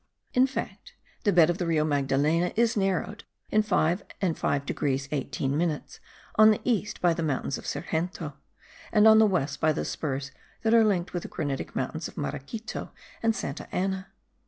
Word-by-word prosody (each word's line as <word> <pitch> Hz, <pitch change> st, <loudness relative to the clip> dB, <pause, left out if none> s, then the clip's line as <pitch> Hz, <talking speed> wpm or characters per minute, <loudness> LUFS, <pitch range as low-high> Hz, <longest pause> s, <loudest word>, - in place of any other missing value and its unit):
In 255 Hz, +1 st, +5 dB
fact, 270 Hz, -, -6 dB, 0.3 s
the 205 Hz, -, +5 dB
bed 170 Hz, -2 st, +6 dB
of 175 Hz, -, -5 dB
the 175 Hz, -, -1 dB
Rio 160 Hz, -2 st, +2 dB
Magdalena 145 Hz, +4 st, +1 dB
is 235 Hz, +1 st, +2 dB
narrowed 195 Hz, +1 st, -1 dB, 0.3 s
in 215 Hz, -, +4 dB
5 180 Hz, -3 st, +1 dB, 0.2 s
and 180 Hz, -5 st, 0 dB
5 140 Hz, 0 st, -1 dB
degrees 135 Hz, -1 st, -1 dB
18 140 Hz, -1 st, -2 dB
minutes, 155 Hz, -1 st, -2 dB, 0.4 s
on 215 Hz, 0 st, +8 dB
the 215 Hz, -, +3 dB
east 215 Hz, -3 st, -1 dB
by 175 Hz, -1 st, +4 dB
the 165 Hz, -, -3 dB
mountains 140 Hz, -3 st, -1 dB
of -, -, -10 dB
Sergento, 160 Hz, -2 st, -3 dB, 0.6 s
and 215 Hz, 0 st, +6 dB
on 220 Hz, 0 st, +8 dB
the 220 Hz, -, +6 dB
west 145 Hz, -7 st, -1 dB
by 155 Hz, -, +4 dB
the -, -, -2 dB
spurs 140 Hz, -2 st, -3 dB, 0.3 s
that 225 Hz, 0 st, +3 dB
are 230 Hz, -1 st, +7 dB
linked 190 Hz, -5 st, +1 dB
with 175 Hz, -, -2 dB
the -, -, -8 dB
granitic 145 Hz, -5 st, -4 dB
mountains -, -, -2 dB
of -, -, -14 dB
Maraquito 140 Hz, -, -5 dB, 0.3 s
and 225 Hz, -1 st, +2 dB
Santa 140 Hz, -8 st, -5 dB
Ana. 190 Hz, +1 st, -1 dB
175 Hz, 180 wpm, -27 LUFS, 145-210 Hz, 0.6 s, on